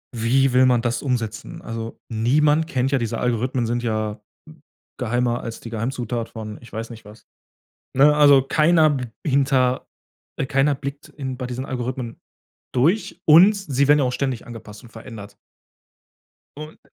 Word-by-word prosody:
Wie 125 +3 +2
will 130 +1 +5
man 125 -2 +3
das 120 0 -1
umsetzen? 115 -5 -3
Also, 115 0 -7
niemand 150 +8 +2
kennt 130 -3 -1
ja 140 - +3
diese 115 -2 -2
Algorithmen, 125 0 -1
sind 120 +1 -2
ja 110 -2 -2 0.8
geheimer 120 0 -1
als 115 -1 -7
die 115 - -9
Geheimzutat 115 0 -3
von, 110 -2 -8
ich 120 - -15
weiß 115 +2 -5
nicht 115 -1 -11
was, 105 +2 -15 0.7
ne? 145 +2 +6
Also, 145 -3 +6
keiner 155 +2 +3
b 130 -3 -2 0.2
hinter 135 -3 +1 0.5
äh, - - 0
keiner 140 +1 +2
blickt 140 +1 -7
in 130 -3 -6
bei 125 -1 -5
diesen 125 +1 -5
Algorithmen 125 -2 -5 0.5
durch 165 - +1
und 175 +7 +8
sie 140 -9 0
werden 145 0 +5
auch 125 -2 0
ständig 130 -2 -3
angepasst 110 -2 -11
und 120 - -14
verändert. 110 -3 -11 1.2
Und 155 +1 -9
125 Hz, 155 wpm, -22 LUFS, 115-140 Hz, 1.2 s, und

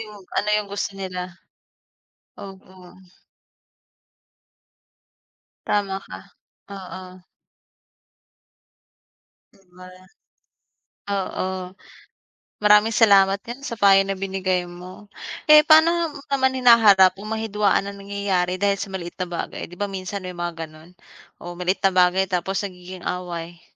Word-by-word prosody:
Yung, 215 -1 -9 0.3
ano 210 - -1
yung 210 -1 -3
gusto 205 - -2
nila. 190 -2 -5 1.2
Oo. 190 -2 -13 2.7
Tama 200 -2 0
ka. - - -9 0.6
Oo. 185 0 -11 2.3
'Di 195 - -26
ba? 185 0 -12 1.3
Oo. 185 -1 -4 0.8
Maraming 210 +2 +4
salamat 195 -3 +5
din 240 +3 -8
sa 260 -5 -6
payo 195 -2 +6
na 195 0 -3
binigay 190 -2 -2
mo. 180 +3 -12 0.4
Eh, 305 0 +8
pa'no 325 +2 +4
mo - - -11
naman 265 -1 +1
hinaharap 215 -7 +6
kung 200 +3 -10
may 220 0 -3
hidwaan 205 -2 +1
na 200 - -6
nangyayari 195 -2 -2
dahil 200 +1 +1
sa - - -5
maliit 180 -3 -6
na 180 - -3
bagay? 170 -1 -6
'Di 175 - -13
ba 205 - -1
minsan 190 0 -6
may 180 - -6
mga 175 -2 -5
gano'n? 155 +2 -17 0.5
Oh, 175 0 -7
maliit 180 +2 -2
na 190 - +3
bagay 185 +1 +3
tapos 190 +2 -2
nagiging 180 -1 -10
away. 175 -1 -5
190 Hz, 120 wpm, -22 LUFS, 180-205 Hz, 2.7 s, Eh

